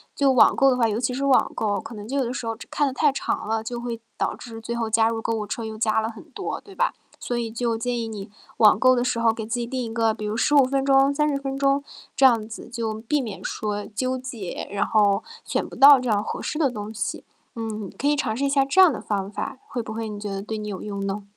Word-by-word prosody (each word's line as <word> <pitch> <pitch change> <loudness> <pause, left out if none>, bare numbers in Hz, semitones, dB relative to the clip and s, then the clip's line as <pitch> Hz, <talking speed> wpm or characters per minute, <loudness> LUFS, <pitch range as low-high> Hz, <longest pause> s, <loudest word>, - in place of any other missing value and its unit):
就 275 -2 +3
网 255 - +6
购 275 - +5
的 250 - +2
话 230 -2 +3
尤 215 +1 -1
其 250 0 -1
是 275 - -1
网 270 -2 +4
购 205 -2 0
哦， - - -4
可 230 - -9
能 210 +1 -8
就 275 +3 -2
有 270 - +2
的 235 - -3
时 255 - -5
候 225 0 -2
这 - - -12
看 290 - +1
得 265 - -1
太 290 +1 +3
长 270 - -3
了， 220 0 -1
就 240 +1 -4
会 235 -1 -4 0.2
导 - - 0
致 225 -2 -9
最 235 +1 -4
后 230 -1 -1
加 225 +1 +3
入 230 0 -1
购 225 - -2
物 210 -1 -3
车 225 +2 -4
又 220 - -6
加 215 0 +1
了 220 +1 -1
很 225 - -12
多， - - -5
对 395 -2 -15
吧？ - - +1 0.3
所 245 - -2
以 230 -2 -2
就 230 -1 -1
建 240 +1 -2
议 225 - -3
你 205 -2 -7 0.3
网 210 -1 +6
购 255 0 +5
的 245 - +1
时 240 - 0
候 230 -1 +3
给 220 -1 -5
自 240 +2 -2
己 235 - -3
定 255 0 -3
一 225 -1 -5
个 225 -2 +2
比 215 - -8
如 210 +2 -2
15 285 +2 +5
分 270 +1 0
钟， 275 0 +4
30 300 -1 +1
分 270 -1 -4
钟 275 0 +2 0.3
这 270 - +5
样 230 -4 +4
子， 225 +1 -9
就 230 -2 -3
避 225 +7 -1
免 220 -7 -6
说 210 -1 -3
纠 255 +4 -2
结， 240 -8 -6
然 205 0 0
后 205 -1 +3 0.2
选 - - -2
不 - - -11
到 280 -1 +9
这 250 -2 -3
样 205 -1 +2
合 - - -4
适 300 - -3
的 280 -6 +2
东 210 -1 -6
西。 200 -2 -4 0.3
嗯， 215 -3 -4
可 285 - -1
以 295 - +4
尝 220 -6 -1
试 280 - 0
一 - - +1
下 275 -1 +3
这 275 +8 +1
样 360 -7 +8
的 - - -5
方 200 -2 -2
法， 265 +6 -5
会 240 -2 -4
不 220 - -6
会 225 0 -4
你 210 -1 -6
觉 205 0 -5
得 195 0 -4
对 220 +1 -5
你 210 0 -5
有 195 - -5
用 200 -1 -4
呢？ 200 +1 -3
230 Hz, 305 characters per minute, -24 LUFS, 215-265 Hz, 0.3 s, 到